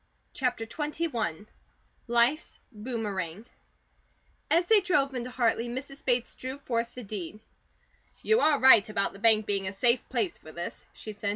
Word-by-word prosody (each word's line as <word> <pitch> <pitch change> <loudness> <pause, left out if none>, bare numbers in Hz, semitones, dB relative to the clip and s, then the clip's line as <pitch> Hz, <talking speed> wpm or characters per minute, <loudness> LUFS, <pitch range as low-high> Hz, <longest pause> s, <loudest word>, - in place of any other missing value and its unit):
CHAPTER 245 -4 -1
XXI 240 - -3 0.6
LIFE'S 240 +6 +1 0.2
BOOMERANG 210 -4 -4 1.0
AS 340 +2 +4
THEY 440 +2 +6
drove 285 -8 +1
into 250 -1 -4
Hartley, 240 -1 0
Mrs. 275 +3 -7
Bates 245 -2 0
drew 260 +2 -6
forth 235 -4 -3
the 250 - -7
deed. 200 -1 -6 0.8
"You 440 +1 +4
are 305 - +3
right 230 -6 +7
about 210 -2 -1
the 195 - -12
bank 220 -1 +4
being 200 -2 -1
a 190 - -4
safe 235 +4 +1
place 230 -8 -1
for 155 - -12
this," 170 +2 -7
she 215 - -8
said. 205 0 -3
235 Hz, 155 wpm, -28 LUFS, 210-265 Hz, 1.0 s, right